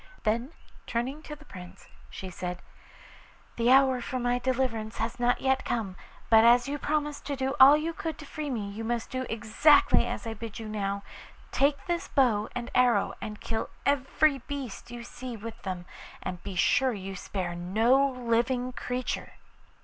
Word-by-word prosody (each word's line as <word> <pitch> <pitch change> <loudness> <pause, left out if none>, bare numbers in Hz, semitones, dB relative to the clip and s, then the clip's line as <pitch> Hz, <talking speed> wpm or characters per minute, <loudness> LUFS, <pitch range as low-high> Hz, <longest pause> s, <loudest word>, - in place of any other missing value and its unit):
Then 235 +6 0 0.4
turning 255 +6 -2
to 300 -1 -8
the 300 +1 -17
Prince 180 -7 -12 0.2
she 190 -1 -7
said, 180 0 -5 0.9
'The 235 +1 +2
hour 265 -1 +5
for 255 - -3
my 245 0 +1
deliverance 245 -4 -1
has 240 +1 -3
not 245 0 +2
yet 265 0 +2
come, 215 -6 -2 0.3
but 220 -1 +7
as 240 +2 +6
you 290 +1 -3
promised 295 -1 -1
to 285 - -1
do 265 0 -1
all 275 +3 +10
you 325 +2 -2
could 320 -2 -4
to 300 - -10
free 300 0 -5
me, 220 -6 -2
you 205 +3 -6
must 235 0 -2
do 255 -1 -3
exactly 230 +7 +4
as - - -4
I 225 - -3
bid 225 -1 -7
you 225 - -6
now. 200 -1 -2 0.5
Take 280 +3 +1
this 345 -2 -2
bow 225 -6 +2
and 240 -1 -4
arrow 245 -5 +3
and 210 -1 -6
kill 225 -1 -3 0.2
every 280 +1 +2
beast 275 -6 -6
you 240 0 -7
see 245 0 -7
with 225 +2 -8
them, 185 -2 -5 0.4
and 180 -1 -5
be 190 +1 -6
sure 255 +8 +3
you 195 -2 -6
spare 185 -2 -4
no 220 +10 +3
living 250 0 0
creature. 250 0 -3
240 Hz, 175 wpm, -28 LUFS, 215-270 Hz, 0.9 s, all